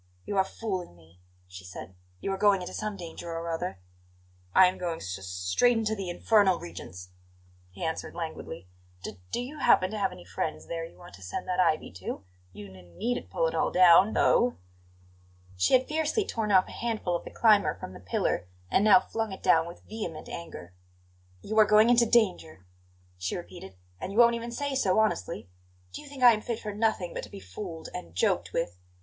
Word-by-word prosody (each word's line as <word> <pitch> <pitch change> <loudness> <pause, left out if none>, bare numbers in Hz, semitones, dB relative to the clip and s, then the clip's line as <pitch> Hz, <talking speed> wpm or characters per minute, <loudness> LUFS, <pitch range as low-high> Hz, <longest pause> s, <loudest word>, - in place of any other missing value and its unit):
"You 205 - -3
are 190 - +5
fooling 190 - -5
me," 85 +1 -21 0.3
she 90 +1 -11
said. 90 +1 -9 0.3
"You 195 - -2
are 195 - -2
going 200 -2 +4
into - - -7
some 215 -2 -4
danger 170 -1 -8
or 165 0 -4
other." 165 - -3 0.8
"I'm 185 0 +6
going 170 -2 -2
s 95 0 -5
s 95 - -9
straight 90 - +2
into 220 -1 0
the 195 -4 -4
infernal 195 0 +3
regions," 90 +1 -9 0.6
he 90 - -9
answered 160 0 -3
languidly. 160 - -6 0.4
"D 100 -3 -7
do - - -1
you 270 +5 -6
happen 185 +1 +4
to 215 - -4
have 195 -1 +1
any 90 - -12
friends 100 - -4
there 165 -1 -4
you 165 - -11
want 175 0 -14
to - - -13
send 95 - -5
that 185 0 -1
ivy 165 -4 +2
to? 95 +1 -6 0.3
You 100 0 -11
n 90 -2 -16
needn't 245 +2 -2
pull - - 0
it - - 0
all - - +1
down, 185 +3 +6
though." 245 0 +3 1.0
She 90 - +4
had 255 0 +2
fiercely 315 +7 0
torn 220 - -2
off 185 -1 +5
a - - -10
handful 220 -7 -2
of 170 - -3
the - - -8
climber 215 -3 +4
from 90 - -9
the - - -10
pillar, 90 -1 -1 0.2
and 195 - +3
now 215 +3 +8
flung 225 -2 -3
it 190 - -9
down 160 0 +4
with 170 - -11
vehement 210 -8 -6
anger. 90 - -8 0.7
"You 220 +1 0
are 215 - +8
going 215 +2 +5
into 235 -1 +5
danger," 180 - +1 0.5
she 90 0 -2
repeated; 95 +1 -10 0.2
"and 190 - -5
you 200 - -6
won't 235 0 +7
even 235 0 -4
say 285 +3 -3
so 200 -8 +2
honestly! 115 - 0 0.5
Do - - -6
you 295 - -13
think 275 -2 -6
I 240 -1 +9
am 215 - -2
fit 230 0 -3
for 210 -1 -5
nothing 210 -5 0
but - - -4
to - - -10
be - - -9
fooled 160 - -8
and 85 0 -8
joked 90 - +1
with? 90 +1 -3
185 Hz, 205 wpm, -28 LUFS, -, 1.0 s, I